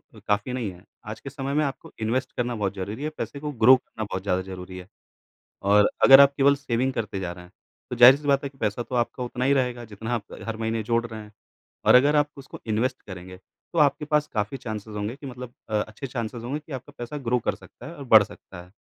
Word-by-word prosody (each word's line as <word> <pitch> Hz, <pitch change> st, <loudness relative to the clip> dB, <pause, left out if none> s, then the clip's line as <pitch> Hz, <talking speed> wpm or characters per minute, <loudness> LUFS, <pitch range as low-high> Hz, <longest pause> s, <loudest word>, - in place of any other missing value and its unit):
अ, -, -, -12 dB
काफ़ी 105 Hz, +5 st, 0 dB
नहीं 115 Hz, -6 st, -2 dB
है। 90 Hz, 0 st, -16 dB, 0.2 s
आज 110 Hz, +1 st, -7 dB
के 140 Hz, -, -8 dB
समय 135 Hz, 0 st, -4 dB
में 150 Hz, +1 st, +2 dB
आपको 135 Hz, -, -6 dB
इन्वेस्ट 120 Hz, +4 st, -1 dB
करना 120 Hz, -1 st, -1 dB
बहुत 100 Hz, -2 st, -1 dB
ज़रूरी 105 Hz, +8 st, -5 dB
है, 155 Hz, -, -1 dB
पैसे 140 Hz, -, -5 dB
को 150 Hz, 0 st, -4 dB
ग्रो 130 Hz, 0 st, +7 dB
करना 110 Hz, -3 st, -8 dB
बहुत 95 Hz, -2 st, -4 dB
ज़्यादा 95 Hz, -2 st, 0 dB
ज़रूरी 95 Hz, 0 st, -8 dB
है। 90 Hz, 0 st, -10 dB, 0.8 s
और 105 Hz, 0 st, +6 dB
अगर 135 Hz, +1 st, +10 dB
आप 140 Hz, 0 st, +6 dB
केवल 140 Hz, +1 st, +5 dB
सेविंग 130 Hz, -1 st, -1 dB
करते 105 Hz, -4 st, -3 dB
जा 90 Hz, -2 st, -3 dB
रहे 90 Hz, 0 st, -10 dB
हैं, 90 Hz, -, -20 dB, 0.4 s
तो 125 Hz, -, -3 dB
जाहिर-सी 130 Hz, +5 st, +7 dB
बात 140 Hz, 0 st, +3 dB
है 140 Hz, -, -3 dB
कि 135 Hz, -, -25 dB
पैसा 110 Hz, +1 st, -1 dB
तो 125 Hz, +2 st, -6 dB
आपका 120 Hz, +1 st, -1 dB
उतना 125 Hz, +1 st, -3 dB
ही 140 Hz, -, +4 dB
रहेगा 125 Hz, -3 st, 0 dB
जितना 110 Hz, +2 st, -5 dB
आप 105 Hz, -, -4 dB, 0.2 s
हर 115 Hz, -1 st, -3 dB
महीने 115 Hz, 0 st, -1 dB
जोड़ 115 Hz, +1 st, 0 dB
रहे 110 Hz, -1 st, -7 dB
हैं। 105 Hz, 0 st, -13 dB, 0.5 s
और -, -, +7 dB
अगर 145 Hz, +4 st, +5 dB
आप 145 Hz, 0 st, +3 dB
उसको 135 Hz, -, -10 dB
इन्वेस्ट 120 Hz, +4 st, 0 dB
करेंगे, 90 Hz, -1 st, -9 dB
तो 165 Hz, -, -7 dB
आपके 145 Hz, 0 st, +3 dB
पास 150 Hz, 0 st, +3 dB
काफ़ी 110 Hz, +5 st, -2 dB
चान्सेस 110 Hz, -3 st, -7 dB
होंगे 105 Hz, +4 st, -3 dB
कि 140 Hz, -, -12 dB
मतलब 125 Hz, -1 st, -8 dB, 0.2 s
अ, 110 Hz, -, -6 dB
अच्छे 110 Hz, +5 st, -7 dB
चान्सेस 115 Hz, -1 st, -5 dB
होंगे 140 Hz, +5 st, -3 dB
कि 155 Hz, 0 st, -17 dB
आपका 145 Hz, +3 st, -18 dB
पैसा 120 Hz, +5 st, -6 dB
ग्रो 125 Hz, -, +3 dB
कर -, -, 0 dB
सकता -, -, -15 dB
है 170 Hz, -, -8 dB
और 140 Hz, -, -8 dB
बढ़ 110 Hz, -4 st, +8 dB
सकता 95 Hz, -3 st, -12 dB
है। 90 Hz, -, -22 dB
120 Hz, 250 wpm, -25 LUFS, 105-135 Hz, 0.8 s, अगर